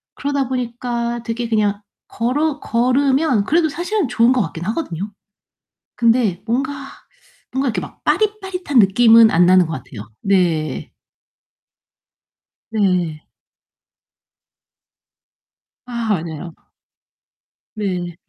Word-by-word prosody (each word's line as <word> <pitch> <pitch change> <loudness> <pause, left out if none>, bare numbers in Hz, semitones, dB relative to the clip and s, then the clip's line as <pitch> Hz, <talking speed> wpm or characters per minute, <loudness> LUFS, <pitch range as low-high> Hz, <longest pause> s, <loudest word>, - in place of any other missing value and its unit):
그러다 280 -2 -2
보니까 240 -1 -3
되게 235 +1 -3
그냥 210 -2 0 0.3
걸어 290 +6 -1
걸으면 255 -1 +1
그래도 320 +4 +2
사실은 350 - -2
좋은 240 +1 +3
것 255 - +2
같긴 165 -1 -5
하거든요. 210 - -3 0.9
근데 230 -6 +2
뭔가 260 +4 0 0.8
뭔가 265 +1 0
이렇게 220 - -2
막 - - -11
빠릿빠릿한 380 - 0
느낌은 225 +2 +6
안 175 -1 +4
나는 185 0 +5
것 160 - -4
같아요. 115 -5 -9
네. 170 -7 0 1.8
네. 180 -7 0 2.6
아 235 -2 -4 0.2
맞아요. 165 +1 -7 1.2
네. 180 -5 -3
230 Hz, 205 characters per minute, -19 LUFS, 185-265 Hz, 2.6 s, 느낌은